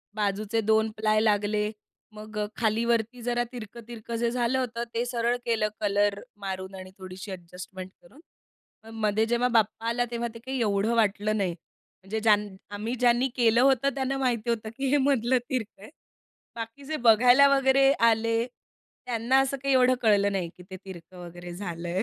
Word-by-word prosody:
बाजूचे 210 Hz, +2 st, -1 dB
2 220 Hz, +1 st, +2 dB
प्लाय 215 Hz, 0 st, +2 dB
लागले. 210 Hz, 0 st, +1 dB, 0.4 s
मग 215 Hz, 0 st, -10 dB, 0.2 s
खालीवरती 230 Hz, +1 st, 0 dB
जरा 240 Hz, 0 st, 0 dB
तिरकं-तिरकं 235 Hz, 0 st, -8 dB
जे 235 Hz, 0 st, +1 dB
झालं 245 Hz, +1 st, 0 dB
होतं 235 Hz, -2 st, -3 dB
ते 235 Hz, +1 st, -1 dB
सरळ 240 Hz, -1 st, 0 dB
केलं 225 Hz, -2 st, +1 dB
कलर 205 Hz, 0 st, +1 dB, 0.2 s
मारून 190 Hz, 0 st, -5 dB
आणि 185 Hz, 0 st, -10 dB
थोडीशी 185 Hz, +1 st, -8 dB
ॲडजस्टमेंट 185 Hz, +1 st, -9 dB
करून, 220 Hz, +12 st, -19 dB, 0.6 s
मग 225 Hz, -, -12 dB
मध्ये 215 Hz, +1 st, +2 dB
जेव्हा 240 Hz, +2 st, +1 dB
बाप्पा 225 Hz, +1 st, 0 dB
आला 240 Hz, +1 st, 0 dB
तेव्हा 235 Hz, 0 st, -2 dB
ते 230 Hz, -, -10 dB
काही 265 Hz, 0 st, -3 dB
एवढं 210 Hz, +1 st, +1 dB
वाटलं 215 Hz, -1 st, +1 dB
नाही. 190 Hz, -4 st, 0 dB, 0.5 s
म्हणजे 210 Hz, +3 st, -3 dB
ज्या 215 Hz, -1 st, +5 dB, 0.4 s
आम्ही 220 Hz, +4 st, -3 dB
ज्यांनी 245 Hz, +1 st, +3 dB
केलं 235 Hz, -1 st, +4 dB
होतं 270 Hz, 0 st, +4 dB
त्यांना 270 Hz, 0 st, -1 dB
माहिती 245 Hz, -4 st, -1 dB
होतं 220 Hz, -2 st, -1 dB
की 270 Hz, -, -1 dB
हे 290 Hz, -, +5 dB
मधलं 260 Hz, -3 st, +2 dB
तिरकं 225 Hz, -6 st, -4 dB
आहे. -, -, -11 dB, 0.7 s
बाकी 230 Hz, +4 st, -7 dB
जे 310 Hz, +3 st, -3 dB
बघायला 250 Hz, +5 st, +7 dB
वगैरे 270 Hz, 0 st, +4 dB
आले. 230 Hz, 0 st, +3 dB, 0.6 s
त्यांना 240 Hz, +2 st, +2 dB
असं 270 Hz, +1 st, 0 dB
काही 275 Hz, -1 st, +2 dB
एवढं 255 Hz, 0 st, +5 dB
कळलं 200 Hz, -3 st, +3 dB
नाही 185 Hz, -3 st, -2 dB
की 180 Hz, -, -13 dB
ते 190 Hz, -, -6 dB
तिरकं 180 Hz, -1 st, -11 dB
वगैरे 175 Hz, 0 st, -9 dB
झालंय. 175 Hz, -1 st, -4 dB
225 Hz, 165 wpm, -27 LUFS, 205-245 Hz, 0.7 s, बघायला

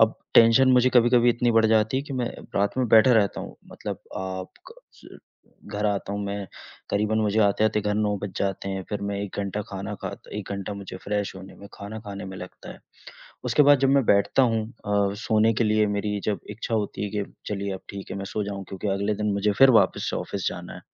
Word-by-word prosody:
अब 110 Hz, 0 st, +5 dB, 0.2 s
टेंशन 115 Hz, +3 st, +7 dB
मुझे 125 Hz, 0 st, +4 dB
कभी-कभी 120 Hz, 0 st, +5 dB
इतनी 120 Hz, +1 st, +1 dB
बढ़ 110 Hz, 0 st, +4 dB
जाती 110 Hz, +3 st, +2 dB
है -, -, -3 dB
कि 140 Hz, -, -8 dB
मैं 120 Hz, -2 st, -1 dB, 0.3 s
रात 100 Hz, +5 st, 0 dB
में 125 Hz, -3 st, +1 dB
बैठा 115 Hz, +4 st, +6 dB
रहता 105 Hz, -4 st, +2 dB
हूँ, -, -, -9 dB, 0.2 s
मतलब -, -, -6 dB, 0.2 s
आप 95 Hz, 0 st, -5 dB, 0.2 s
क -, -, -20 dB
स -, -, -15 dB, 0.5 s
घर 105 Hz, +1 st, -1 dB
आता 100 Hz, -1 st, -2 dB
हूँ 100 Hz, 0 st, -3 dB
मैं 100 Hz, -1 st, -4 dB, 0.4 s
करीबन 105 Hz, +2 st, +1 dB
मुझे 105 Hz, 0 st, +1 dB
आते-आते 105 Hz, +1 st, +2 dB
घर 105 Hz, 0 st, -1 dB
9 105 Hz, -1 st, +1 dB
बज 100 Hz, -, -4 dB
जाते 100 Hz, 0 st, -2 dB
हैं, 95 Hz, -1 st, -3 dB
फिर 105 Hz, -, -3 dB
मैं 100 Hz, 0 st, -2 dB
1 100 Hz, -, -7 dB
घंटा 100 Hz, +1 st, -3 dB
खाना 100 Hz, +1 st, -5 dB
खाता -, -, -7 dB
1 105 Hz, -1 st, -6 dB
घंटा 100 Hz, +1 st, -4 dB
मुझे 100 Hz, -2 st, -8 dB
फ्रेश 100 Hz, -1 st, -2 dB
होने 95 Hz, +1 st, -11 dB
में, 100 Hz, -, -12 dB
खाना 105 Hz, +2 st, -7 dB
खाने 100 Hz, -2 st, -7 dB
में 95 Hz, 0 st, -8 dB
लगता 90 Hz, 0 st, -10 dB
है। -, -, -15 dB, 0.7 s
उसके 150 Hz, -, +4 dB
बाद 145 Hz, 0 st, +6 dB
जब 135 Hz, -, +3 dB
मैं 140 Hz, -2 st, +4 dB
बैठता 100 Hz, +6 st, +3 dB
हूँ, 115 Hz, -3 st, +2 dB
अ, 100 Hz, -3 st, -1 dB
सोने 110 Hz, 0 st, +3 dB
के 115 Hz, -, +1 dB
लिए 105 Hz, 0 st, +3 dB
मेरी 105 Hz, 0 st, -1 dB
जब 105 Hz, -2 st, -1 dB
इच्छा 115 Hz, +2 st, -4 dB
होती 105 Hz, -2 st, -2 dB
है 100 Hz, -, -4 dB
कि 105 Hz, -1 st, -2 dB, 0.2 s
चलिए 100 Hz, -1 st, -3 dB
अब 95 Hz, -, -8 dB
ठीक 100 Hz, -1 st, -8 dB
है, -, -, -4 dB
मैं 100 Hz, -, -4 dB
सो 105 Hz, +2 st, -3 dB
जाऊँ 100 Hz, -1 st, -5 dB
क्योंकि 95 Hz, +2 st, -4 dB
अगले 100 Hz, +2 st, 0 dB
दिन 105 Hz, +1 st, -1 dB
मुझे 100 Hz, +1 st, +1 dB
फिर 135 Hz, 0 st, +8 dB
वापस 115 Hz, -, +3 dB
से -, -, -2 dB
ऑफ़िस -, -, -3 dB
जाना -, -, -7 dB
है। -, -, -10 dB
105 Hz, 230 wpm, -25 LUFS, 100-110 Hz, 0.7 s, फिर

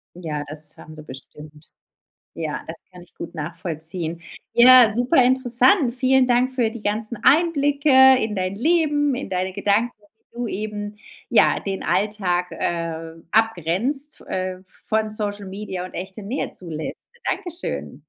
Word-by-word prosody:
Ja, 155 Hz, -4 st, -5 dB
das 150 Hz, 0 st, -12 dB
haben 155 Hz, 0 st, -12 dB
sie 155 Hz, -, -11 dB
bestimmt. 150 Hz, +3 st, -13 dB, 0.7 s
Ja, 155 Hz, -2 st, -4 dB
das 165 Hz, +1 st, -7 dB, 0.2 s
kann 180 Hz, -1 st, -13 dB
ich 175 Hz, -, -21 dB
gut 170 Hz, -, -8 dB
nachvollziehen. 165 Hz, +1 st, -5 dB, 0.3 s
Ja, 245 Hz, -2 st, +7 dB
super 245 Hz, +3 st, +3 dB
interessant. 255 Hz, -, +3 dB
Vielen 260 Hz, 0 st, +4 dB
Dank 250 Hz, +1 st, +2 dB
für 235 Hz, -4 st, +1 dB
die 230 Hz, -2 st, -10 dB
ganzen 215 Hz, +3 st, -2 dB
Einblicke 290 Hz, -2 st, +3 dB, 0.3 s
in 220 Hz, -2 st, -2 dB
dein 185 Hz, +1 st, -2 dB
Leben, 295 Hz, 0 st, +1 dB
in 250 Hz, -6 st, -6 dB
deine 185 Hz, 0 st, -2 dB
Gedanken, 205 Hz, +4 st, +1 dB, 0.4 s
wie -, -, -18 dB
du 245 Hz, -, -2 dB
eben, 210 Hz, 0 st, -5 dB, 0.3 s
ja, -, -, +4 dB
den 195 Hz, -1 st, -4 dB
Alltag, 190 Hz, -4 st, 0 dB
äh, 165 Hz, -1 st, -4 dB, 0.2 s
abgrenzt, 225 Hz, -, 0 dB
äh, 185 Hz, 0 st, -3 dB
v -, -, -31 dB, 0.2 s
von 220 Hz, -1 st, 0 dB
Social 205 Hz, -2 st, -2 dB
Media 190 Hz, -2 st, -6 dB
und -, -, -15 dB
echte 190 Hz, +4 st, -7 dB
Nähe 240 Hz, +8 st, -3 dB
zulässt. 160 Hz, -4 st, -6 dB, 0.3 s
Dankeschön. 350 Hz, -2 st, -4 dB
205 Hz, 145 wpm, -22 LUFS, 175-250 Hz, 0.7 s, Ja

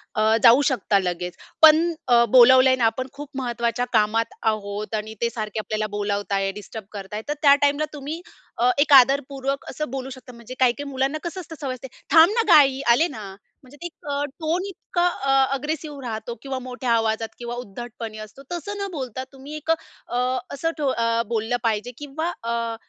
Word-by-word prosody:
अ, -, -, +1 dB, 0.2 s
जाऊ 245 Hz, +3 st, +8 dB
शकता 215 Hz, -6 st, +1 dB
लगेच. 180 Hz, -1 st, -3 dB, 0.3 s
पण 320 Hz, +2 st, +7 dB
अ, 240 Hz, -1 st, +5 dB
बोलावलंय 255 Hz, +2 st, +7 dB
अन 255 Hz, -, -7 dB
आपण 245 Hz, +3 st, +1 dB
खूप 290 Hz, 0 st, -9 dB
महत्त्वाच्या 240 Hz, -1 st, -1 dB
कामात 225 Hz, +1 st, +2 dB, 0.2 s
आहोत 205 Hz, 0 st, -5 dB
आणि 215 Hz, +1 st, -4 dB
ते 235 Hz, -, +2 dB
सारखे 215 Hz, -2 st, -4 dB
आपल्याला 215 Hz, 0 st, -2 dB
बोलावताय, 200 Hz, -1 st, -1 dB
डिस्टर्ब 210 Hz, +1 st, -9 dB
करताय, 205 Hz, +1 st, -6 dB
तर 295 Hz, -, 0 dB
त्या 280 Hz, -2 st, +7 dB
टाईमला 285 Hz, +1 st, +2 dB
तुम्ही 300 Hz, +3 st, -6 dB, 0.4 s
अ, 245 Hz, +1 st, +4 dB
एक 290 Hz, 0 st, +4 dB
आदरपूर्वक 275 Hz, +1 st, +3 dB
असं 305 Hz, -2 st, -4 dB
बोलू 265 Hz, 0 st, -4 dB
शकता, 260 Hz, -1 st, -11 dB
म्हणजे 235 Hz, +1 st, -10 dB
काही, 255 Hz, -2 st, +4 dB
काही 285 Hz, +2 st, -7 dB
मुलांना 270 Hz, +3 st, -1 dB
कसं 345 Hz, +2 st, -5 dB
असतं 325 Hz, -1 st, -10 dB
सवय 270 Hz, -3 st, -2 dB
असते. 255 Hz, +1 st, -9 dB, 0.2 s
"थांब 325 Hz, +4 st, +7 dB
ना 465 Hz, -, +2 dB
ग -, -, -2 dB
आई 270 Hz, -3 st, +5 dB
आले 310 Hz, +8 st, +4 dB
ना." 225 Hz, -10 st, -8 dB, 0.4 s
म्हणजे 265 Hz, +3 st, -16 dB
ते -, -, -7 dB
एक 335 Hz, -3 st, -10 dB
अ, 285 Hz, 0 st, -1 dB, 0.2 s
टोन 335 Hz, +4 st, -1 dB
इतका 355 Hz, -2 st, -2 dB
अ, 275 Hz, -6 st, -1 dB, 0.2 s
अग्रेसिव्ह 295 Hz, +1 st, -4 dB
राहतो 225 Hz, 0 st, -5 dB
किंवा 270 Hz, -1 st, -4 dB
मोठ्या 250 Hz, -1 st, -4 dB
आवाजात 225 Hz, -1 st, +1 dB
किंवा 240 Hz, 0 st, -5 dB
उद्धटपणे 235 Hz, -1 st, -7 dB
असतो, 215 Hz, +6 st, -11 dB
तसं 405 Hz, +4 st, -5 dB
न -, -, -2 dB
बोलता 260 Hz, -5 st, -5 dB
तुम्ही 275 Hz, +3 st, -9 dB
एक 305 Hz, +2 st, -2 dB
अ, 320 Hz, -6 st, -5 dB, 0.4 s
असं 325 Hz, +4 st, -1 dB
ठो 295 Hz, -2 st, -1 dB
अ, 230 Hz, -1 st, +1 dB
बोललं 230 Hz, +1 st, -1 dB
पाहिजे 225 Hz, +1 st, -1 dB
किंवा 300 Hz, +4 st, -4 dB
अ, 230 Hz, 0 st, -2 dB
255 Hz, 190 wpm, -23 LUFS, 225-285 Hz, 0.4 s, जाऊ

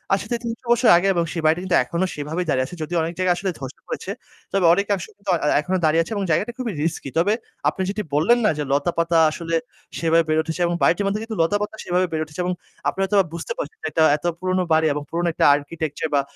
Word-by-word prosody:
আসলে 240 Hz, +4 st, -3 dB
৩০০ 230 Hz, 0 st, -4 dB
বছর 240 Hz, 0 st, +4 dB
আগে 190 Hz, +3 st, +1 dB
এবং 170 Hz, -1 st, +1 dB
সেই 165 Hz, -, -2 dB
বাড়িটি 160 Hz, +3 st, +3 dB
কিন্তু 180 Hz, -, +3 dB
এখনো 170 Hz, +8 st, -1 dB
সেইভাবেই 155 Hz, +5 st, -3 dB
দাঁড়িয়ে 130 Hz, -2 st, +2 dB
আছে। 180 Hz, -, -9 dB
যদিও 170 Hz, +3 st, -2 dB
অনেক 165 Hz, +1 st, -3 dB
জায়গা 185 Hz, -1 st, +2 dB
আসলে 190 Hz, +1 st, -2 dB
ধসে 135 Hz, 0 st, -8 dB
পড়েছে। 190 Hz, -, -5 dB, 0.4 s
তবে 195 Hz, -3 st, +2 dB
অনেক 200 Hz, +3 st, +1 dB
অংশ 180 Hz, -, -6 dB
কিন্তু 200 Hz, -1 st, -8 dB
এ্যা -, -, +3 dB
এ্যা -, -, +3 dB
এখনো 185 Hz, +5 st, -1 dB
দাঁড়িয়ে 160 Hz, +2 st, +4 dB
আছে -, -, -12 dB
এবং 200 Hz, -, -1 dB
জায়গাটা 205 Hz, +9 st, +1 dB
খুবই 245 Hz, -4 st, -3 dB
risky। 165 Hz, -4 st, -2 dB
তবে 200 Hz, +6 st, +3 dB, 0.4 s
আপনি 190 Hz, -, -5 dB
যেটি 210 Hz, +1 st, -2 dB
বললেন 205 Hz, +11 st, +4 dB
না -, -, +5 dB
যে 150 Hz, -, -1 dB
লতাপাতা 165 Hz, +3 st, +1 dB
আসলে 165 Hz, +1 st, -3 dB, 0.4 s
সেভাবে 165 Hz, 0 st, +3 dB
বের 155 Hz, 0 st, +1 dB
হচ্ছে 160 Hz, +2 st, -2 dB
এবং 175 Hz, -, -1 dB
বাড়িটির 200 Hz, +4 st, +3 dB
মধ্যে 210 Hz, +2 st, -1 dB
কিন্তু 225 Hz, -1 st, -5 dB
লতাপাতা 205 Hz, +5 st, 0 dB
সেভাবে 180 Hz, +1 st, +1 dB
বের 155 Hz, -1 st, -1 dB
উঠেছে। 150 Hz, +3 st, -12 dB
এবং 180 Hz, -, 0 dB, 0.4 s
আপনারা 195 Hz, -, -2 dB
হয়তোবা 195 Hz, -1 st, +3 dB
বুঝতে 170 Hz, -, -4 dB
পারছেন 470 Hz, -3 st, -5 dB
যে -, -, -1 dB
এটা 160 Hz, -, +3 dB
এত 155 Hz, -, -12 dB
পুরনো 185 Hz, 0 st, 0 dB
বাড়ি 160 Hz, 0 st, +4 dB
এবং 150 Hz, -, -4 dB
পুরনো 170 Hz, +1 st, -1 dB
একটা -, -, +2 dB
architecture 155 Hz, +1 st, -4 dB
বা 140 Hz, -, +4 dB
175 Hz, 240 wpm, -22 LUFS, 160-195 Hz, 0.4 s, না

